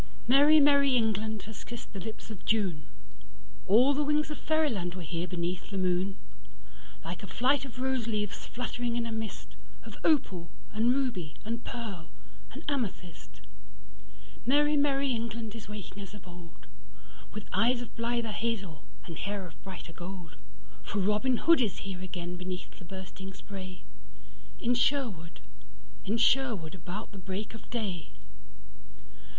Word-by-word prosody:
Merry, 290 +5 +8
merry 280 -2 +6
England 220 -1 +1
has 220 0 -8
kissed 235 -2 -8
the 195 - -4
lips 220 +3 -7
of 190 -5 -8
June:All 155 - +1
the 295 +2 +2
wings 300 +1 +2
of 300 - -5
fairyland 250 - +1
were 185 - -5
here 170 +2 -2
beneath 180 0 -2
the 200 - -3
moon; 185 +1 +1 0.9
Like 165 0 -4
a 200 - -6
flight 270 +5 +3
of 250 -2 -9
rose 260 -3 +1
leaves 210 -2 -2
fluttering 245 -1 -2
in 235 -1 +1
a 230 - -3
mistOf 220 -2 -7
opal 190 - +3 0.2
and 225 +3 +4
ruby 245 - 0
and 230 +2 -2
pearl 200 -9 -5 0.4
and 280 - -8
amethyst. 200 - -3 1.0
Merry, 295 +4 +4
merry 280 -1 +3
England 230 -2 -2
is 225 -3 -8
waking 205 -1 -6
as 195 0 -8
of 185 -4 -12
old, 175 -1 -12 0.7
With 210 -1 -6
eyes 240 +5 +3
of 230 - -12
blither 235 -1 0
hazel 200 -8 -2 0.2
and 165 - -6
hair 200 -1 -2
of 170 - -13
brighter 185 -3 -8
gold:For 160 -3 -9
Robin 210 +6 +3
Hood 330 0 +6
is 210 -7 +1
here 190 -2 -4
again 180 -1 -4
beneath 180 0 -5
the 180 - -10
bursting 190 +1 -7
sprayIn 185 -1 -8 0.9
Sherwood, 225 - +1 0.6
in 215 +4 +1
Sherwood, 230 -9 +3
about 190 +4 -6
the 200 - -9
break 190 +4 -4
of 225 - -11
day. 200 -9 -3
210 Hz, 145 wpm, -31 LUFS, 180-240 Hz, 1.0 s, Merry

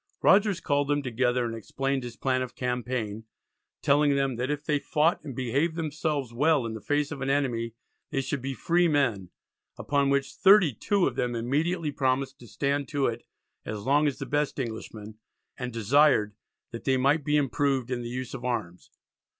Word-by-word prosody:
Rogers 200 -2 +4
called 145 -3 0
them 145 0 0
together, 125 0 0
and 115 - -3
explained 135 +4 -2
his 120 -1 -7
plan 130 +1 0
of 130 -1 -5
campaign, 125 -3 -3 0.6
telling 145 0 +4
them 135 -2 0
that 125 +2 -2
if 150 0 -3
they 150 -1 +1
fought 155 +3 +1
and 135 - -7
behaved 140 +7 0
themselves 155 -5 -2
well 145 +1 +2
in 115 - -4
the 110 - -7
face 145 +3 0
of 140 -3 -6
an 135 - -1
enemy 120 -5 0 0.3
they 135 - -1
should 135 +1 -3
be 135 +1 -4
free 175 +4 +2
men, 120 - +1 0.5
upon 140 -1 +1
which 140 0 0
"32 195 - +4
of 130 - -1
them 120 -1 -1
immediately 150 +7 0
promised 135 0 -1
to 120 - -13
stand 140 +4 -1
to 140 -1 0
it 120 0 -1 0.4
as 105 -1 -5
long 145 +5 +3
as 140 - -1
the - - -5
best 145 0 -1
Englishman, 110 -3 -6 0.4
and 125 -1 -5
desired 115 -1 +3 0.4
they 130 +3 0
might 140 +4 +2
be 150 +2 +2
improved 135 -2 0
in 125 -1 -1
the 120 - -5
use 130 +1 -5
of - - -7
arms." 90 -8 -4
135 Hz, 180 wpm, -27 LUFS, 120-145 Hz, 0.6 s, Rogers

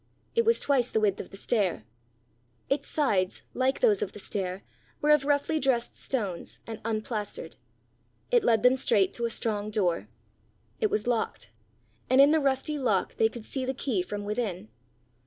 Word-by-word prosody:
It 465 0 +2
was 460 +1 +4
twice 260 -4 +2
the - - +1
width 205 -3 +1
of - - -6
the 195 - -11
stair. 195 - 0 0.9
Its 275 0 0
sides, 205 -11 0
like 260 +1 0
those 435 -5 +4
of 195 - -2
the - - -9
stair, 190 -1 -3 0.4
were 300 - +3
of 300 -2 +4
roughly 290 +2 +1
dressed 250 -4 0
stones, 200 -10 -3
and 225 -1 -7
unplastered. 215 -1 -3 0.8
It 480 -3 +4
led 225 -2 +3
them 250 +1 +5
straight 200 -6 +2
to 235 - -2
a - - 0
strong 215 -2 -1
door. 180 - 0 0.7
It 215 - +2
was 210 0 -1
locked, 230 - -2 0.6
and 260 +1 +4
in 280 +2 +8
the 320 - +4
rusty 280 +1 0
lock 220 -8 0
they 220 - +4
could 225 -1 -9
see 265 - -3
the 260 +1 -2
key 240 -8 0
from 205 +3 -5
within. 205 - -3
230 Hz, 175 wpm, -28 LUFS, 205-275 Hz, 0.9 s, in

